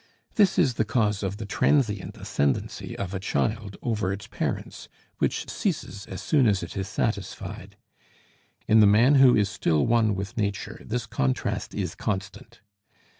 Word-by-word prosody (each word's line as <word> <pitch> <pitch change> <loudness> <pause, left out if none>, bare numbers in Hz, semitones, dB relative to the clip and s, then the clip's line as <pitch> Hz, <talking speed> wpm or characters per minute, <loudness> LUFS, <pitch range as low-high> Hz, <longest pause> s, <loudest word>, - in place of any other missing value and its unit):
This 205 -4 +3
is 145 -9 +4
the - - +4
cause 105 -2 0
of 100 0 -3
the 110 - -6
transient 105 -1 +1
ascendency 70 -1 -2
of 100 -1 -4
a 95 - -2
child 105 +1 -2
over 110 -5 0
its 100 +1 -5
parents, - - -4 0.3
which - - 0
ceases 100 - -3
as 95 - -7
soon 140 -6 +3
as 100 -3 +2
it - - -7
is 95 -1 -3
satisfied; 105 -1 -4 0.9
in 110 - +6
the 105 - +7
man 115 +7 +5
who 125 -2 +7
is 105 -3 +3
still 80 -5 +1
one 115 -3 +3
with 100 +3 -5
nature, 100 -3 -3
this 120 +1 -3
contrast 65 - -2
is - - -2
constant. 105 +3 -5
105 Hz, 160 wpm, -26 LUFS, 100-115 Hz, 0.9 s, the